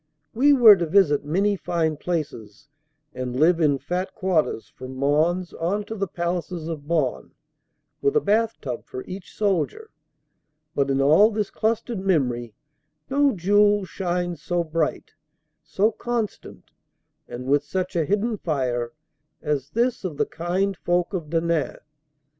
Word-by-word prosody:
We 275 +6 +4
were 240 -7 +9
to 170 -2 -1
visit 155 -5 +3
many 195 +7 +1
fine 165 -4 -1
places 145 - -5 0.4
and 125 0 -4
live 165 +2 +4
in 145 -3 +3
fat 180 +6 -4
quarters, 180 - 0
from 130 +1 -10
Mons 155 +6 +1
on 195 +5 -1
to 220 - -6
the 195 -2 -2
palaces 175 -1 -3
of 150 -3 -6
Bonn, 155 -6 -1 0.7
with 420 +1 +1
a - - +6
bath 225 - +1
tub 125 -4 -5
for 130 - -7
each 185 0 -9
soldier; 210 - -1 0.8
but 140 -2 0
in 135 0 +2
all 160 +10 +6
this 210 -2 -2
clustered 225 0 -1
memory 125 - 0 0.6
no 280 0 +3
jewel 205 +2 +3
shines 175 -3 -3
so 175 +2 -1
bright, 160 -1 -2 0.5
so 210 +3 +1
constant 235 -4 -5 0.6
and 125 +1 -7
with 145 +2 +2
such 185 +4 -3
a 165 - +2
hidden 210 +3 0
fire 125 -6 -2 0.5
as 145 -2 -1
this 240 +5 0
of 170 -6 -4
the - - +2
kind 180 +4 -2
folk 175 +2 0
of 165 -5 -4
Denain. 165 -1 0
175 Hz, 145 wpm, -24 LUFS, 150-200 Hz, 0.8 s, were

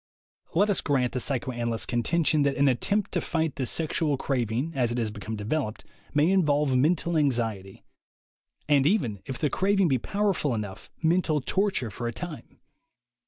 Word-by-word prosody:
Let 205 +4 +4
us 195 - +1
grant 130 -4 +1
the 130 - -2
psychoanalysts' 120 -3 -2
contention 155 +5 +1
that 140 -1 +2
an 140 0 +4
attempt 195 - +1
to - - 0
fight 160 -3 -1
the 130 - -1
sexual 155 -1 0
craving, 125 +2 -1
as 125 -4 +1
it 120 - -2
has 115 -3 -1
become 105 +1 -6
developed, 110 +2 -3 0.3
may 150 +5 +3
involve 150 -7 +2
mental 165 +5 +2
anxiety, 115 -10 -1 0.8
and 145 -2 +4
even, 120 - 0
if 130 - -4
the 150 - 0
craving 195 -2 +2
be 130 -2 +2
powerful 195 - 0
enough, 105 -3 -6
mental 160 -2 +2
torture 190 - -1
for 120 +5 -4
a - - -1
time. 165 +4 -8
140 Hz, 165 wpm, -27 LUFS, 120-165 Hz, 0.8 s, Let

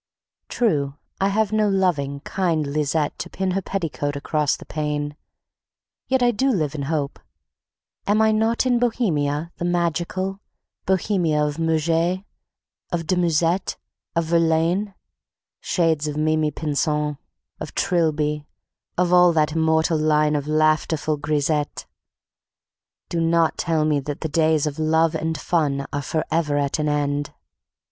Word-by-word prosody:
True, 145 - 0 0.2
I 195 - +2
have 210 +1 +1
no 215 -1 +2
loving, 150 -8 0
kind 170 -5 0
Lisette 150 +1 -1
to - - -5
pin 190 -1 -2
her 195 +2 0
petticoat 165 -7 -3
across 150 +1 0
the - - -12
pane, 150 -1 -3 0.9
yet 260 -1 +2
I 240 - +4
do 260 +5 +1
live 155 - 0
in 150 - -4
hope. 145 -3 -2 0.9
Am 205 +2 +3
I 220 0 +4
not 225 +3 +1
in 245 -2 +3
Bohemia 170 - 0
the 175 - -3
Magical, 175 +2 -1 0.5
Bohemia 175 -5 +1
of 150 +1 -3
Murger, 165 +3 +1 0.7
of 170 -2 -2
de 185 - +1
Musset, 175 +1 +1 0.4
of 165 0 +1
Verlaine? 170 +4 +1 0.6
Shades 160 -4 +1
of 150 0 -3
Mimi 155 0 +2
Pinson, 150 0 -1 0.4
of - - -7
Trilby, 150 -3 0 0.5
of 180 0 +2
all 180 -1 +7
that 155 -1 +2
immortal 160 0 +2
line 150 -1 +2
of 145 0 -2
laughterful 155 0 +1
grisettes, 150 0 -1 1.2
do 170 - -2
not 165 0 +2
tell 160 -3 0
me 150 -2 +2
that 145 +1 -5
the 160 - -2
days 155 -1 +2
of 150 0 -3
love 160 +1 +2
and 160 0 -2
fun 145 -5 0
are 145 - -1
forever 155 0 -1
at 140 +2 0
an 150 0 +1
end! 145 0 -1
160 Hz, 140 wpm, -22 LUFS, 150-175 Hz, 1.2 s, all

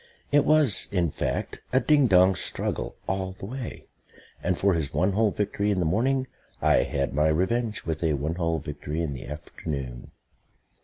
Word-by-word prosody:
It 145 0 +4
was, 150 -8 +5
in 90 -5 +1
fact, - - -3
a 130 - +4
ding 145 0 +4
dong 95 -1 +6
struggle - - -3
all 95 -1 -2
the 95 - -9
way; 125 +3 -6 0.6
and 90 - 0
for 100 -1 +3
his 80 -5 -1
one 95 +3 +2
hole 110 +2 +3
victory 105 0 -1
in 100 - +1
the 90 - +1
morning 130 +10 +1 0.3
I - - +4
had 70 -2 0
my 75 +2 +3
revenge 105 +8 0
with 80 0 -3
a 80 -2 +2
one 75 +3 -1
hole 85 -1 +1
victory 75 +1 -4
in 75 -4 -2
the 65 - -8
afternoon. 70 -4 -6
95 Hz, 175 wpm, -26 LUFS, 75-110 Hz, 0.6 s, dong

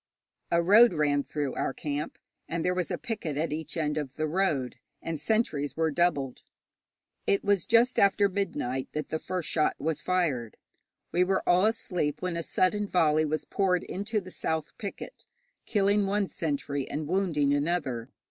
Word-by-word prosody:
A 170 0 +3
road 210 +2 +7
ran 145 -2 +2
through 145 -3 -3
our - - -2
camp, 150 +1 -4 0.3
and 165 0 -2
there 180 - +2
was 180 -2 -1
a - - -2
picket 185 -11 -4
at 155 0 -1
each 160 +2 -5
end 150 -1 0
of 135 -3 -6
the 155 - -1
road, 155 -7 0 0.2
and 165 -2 -4
sentries 155 -8 0
were 160 -1 +2
doubled. 145 -5 0 0.9
It 200 - +2
was 200 -4 +1
just 235 +2 +4
after 200 +1 +4
midnight 170 -10 -2
that 150 -1 -3
the 160 - -2
first 180 -2 -4
shot 155 -2 +1
was 155 -1 -2
fired. 150 -12 0 0.5
We 180 - +3
were 190 +1 0
all 180 +4 +5
asleep 180 -9 -1
when 180 -2 -2
a 170 - -1
sudden 205 +5 +1
volley 155 -4 +3
was 155 +1 -2
poured 185 -3 +1
into 210 +3 -2
the 185 -2 -10
south 160 -3 -3
picket, 200 - -7 0.4
killing 200 -1 +2
one 200 +1 +1
sentry 145 -5 -3
and 150 +1 -3
wounding 160 -6 +1
another. 145 -6 -1
165 Hz, 170 wpm, -28 LUFS, 150-195 Hz, 0.9 s, road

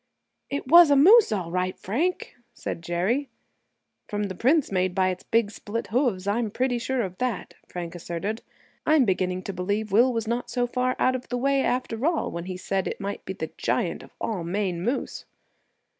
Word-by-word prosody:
"It 280 -1 -3
was 340 +2 +8
a 285 - +5
moose, 395 - +7
all 180 -5 -2
right, 185 +1 -1
Frank!" 320 - -2 0.2
said - - -5
Jerry. 185 - -1 0.8
"From 210 0 -2
the 195 -2 -3
prints 270 - +2
made 185 -1 0
by 185 -1 +3
its 185 -1 -4
big 225 -2 +1
split 225 +2 -5
hoofs, 235 -8 +1
I'm 215 +2 0
pretty 245 +3 0
sure 250 +1 -1
of 185 -2 -6
that," 250 -5 -2
Frank 175 -2 -6
asserted; 175 +6 -4 0.4
"I'm 310 -4 +4
beginning 185 -2 0
to 195 - -5
believe 205 +4 -2
Will 240 +6 +5
was 225 -2 -2
not 235 +2 -2
so 245 0 0
far 250 +1 0
out 255 - +2
of 255 - -6
the 245 - -1
way, 275 +2 +2
after 250 -2 -1
all, 330 +1 +1
when 170 0 -5
he 185 -1 -5
said 190 +1 -2
it - - -4
might 200 0 -4
be 190 - -4
the 160 -4 -5
giant - - 0
of - - -14
all 205 -6 -2
Maine 180 0 -2
moose!" 245 +9 -2
215 Hz, 195 wpm, -25 LUFS, 185-255 Hz, 0.8 s, was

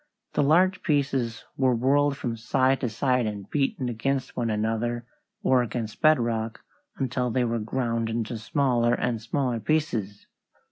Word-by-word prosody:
The - - +2
large 180 +7 +4
pieces 135 -6 0
were 130 -2 +3
whirled 140 +3 +2
from 120 -2 -3
side 130 +3 +1
to 125 - 0
side 125 +1 +1
and 100 -2 -5
beaten 135 -3 -1
against 130 +3 -2
one 120 -2 -1
another 115 +2 -1 0.4
or 130 -8 +4
against 115 -2 -4
bedrock 115 -7 +2 0.4
until 125 -1 -1
they 125 +1 +1
were 115 -1 0
ground 115 0 -1
into 115 0 -3
smaller 120 0 +2
and 120 -3 -1
smaller 125 0 -1
pieces. 115 -9 -1
120 Hz, 145 wpm, -26 LUFS, 115-135 Hz, 0.4 s, large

